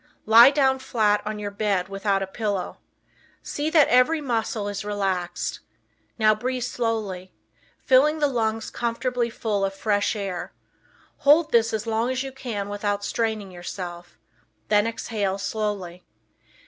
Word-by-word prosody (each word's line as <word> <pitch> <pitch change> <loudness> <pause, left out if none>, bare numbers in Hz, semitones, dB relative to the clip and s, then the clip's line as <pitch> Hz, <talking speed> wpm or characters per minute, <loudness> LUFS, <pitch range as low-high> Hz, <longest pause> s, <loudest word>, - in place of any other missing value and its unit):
Lie 230 +4 +9
down 270 -2 +2
flat 215 -5 +1
on 215 0 -3
your 205 -1 -5
bed 200 -3 0
without 195 0 -1
a - - -2
pillow. 200 -1 -3 0.6
See 295 +2 -2
that 315 -3 +5
every 255 +6 +4
muscle 225 -6 -2
is 205 0 -4
relaxed. 195 -4 -2 0.6
Now 215 -1 +5
breathe 250 +3 -3
slowly, 220 -7 -3 0.5
filling 280 +4 +4
the 300 - +2
lungs 225 -5 -1
comfortably 240 +1 -1
full 210 -3 -2
of 195 0 -1
fresh 205 +2 0
air; 195 -4 -5 0.6
hold 300 +3 +4
this 230 -1 +3
as 220 0 -2
long 225 +2 0
as 260 +1 -1
you 270 - -6
can 235 -7 -5
without 205 0 -2
straining 220 -4 -2
yourself; 175 -1 -8 0.5
then 210 +1 +3
exhale 210 -4 -2
slowly. 200 -4 -4
215 Hz, 140 wpm, -24 LUFS, 200-245 Hz, 0.6 s, Lie